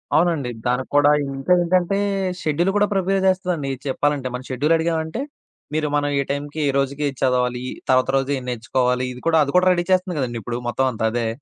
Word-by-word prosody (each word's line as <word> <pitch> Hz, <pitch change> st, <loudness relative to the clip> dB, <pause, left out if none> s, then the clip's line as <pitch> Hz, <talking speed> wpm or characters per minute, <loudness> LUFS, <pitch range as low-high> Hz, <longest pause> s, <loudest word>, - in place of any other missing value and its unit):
అవునండి. 160 Hz, -5 st, +2 dB, 0.2 s
దానికి 125 Hz, +1 st, 0 dB
కూడా 145 Hz, 0 st, +6 dB, 0.2 s
ఇంకా 135 Hz, +7 st, +1 dB
ఏంటంటే, 180 Hz, +2 st, +1 dB, 0.4 s
షెడ్యూల్ 165 Hz, +5 st, +1 dB
కూడా 205 Hz, 0 st, +3 dB
ప్రిపేర్ 195 Hz, 0 st, +1 dB
జేస్తదండి. 180 Hz, -6 st, 0 dB, 0.2 s
చెప్పాలంటే 140 Hz, 0 st, 0 dB
మనం 125 Hz, +1 st, -5 dB
షెడ్యూలడిగామంటే, 160 Hz, -, 0 dB, 0.5 s
మీరు 155 Hz, 0 st, 0 dB
మనం 145 Hz, 0 st, +1 dB
ఏ -, -, -1 dB
టైంకి 145 Hz, +2 st, -4 dB
ఏ -, -, +2 dB
రోజుకి 140 Hz, +2 st, -1 dB
ఏది 135 Hz, -2 st, -5 dB
చదవాలి? 125 Hz, -1 st, +1 dB, 0.3 s
తర్వాత 130 Hz, 0 st, +3 dB
రోజు 135 Hz, +1 st, -1 dB
ఏం 130 Hz, -, -7 dB
నేర్చుకోవాలి? 125 Hz, +1 st, 0 dB
ఇది 125 Hz, -, -11 dB
కూడా 165 Hz, -1 st, +4 dB
అది 140 Hz, -, -3 dB
కూడా 180 Hz, +1 st, +5 dB
రెడీ 175 Hz, -1 st, 0 dB
చేస్తుంది 185 Hz, -2 st, +1 dB
కదండీ! 120 Hz, -3 st, -2 dB
ఇప్పుడు 120 Hz, -1 st, -3 dB
మొత్తం 130 Hz, +2 st, 0 dB
అంతా 110 Hz, -1 st, -2 dB
అదే. 120 Hz, 0 st, -1 dB
145 Hz, 185 wpm, -21 LUFS, 130-170 Hz, 0.5 s, కూడా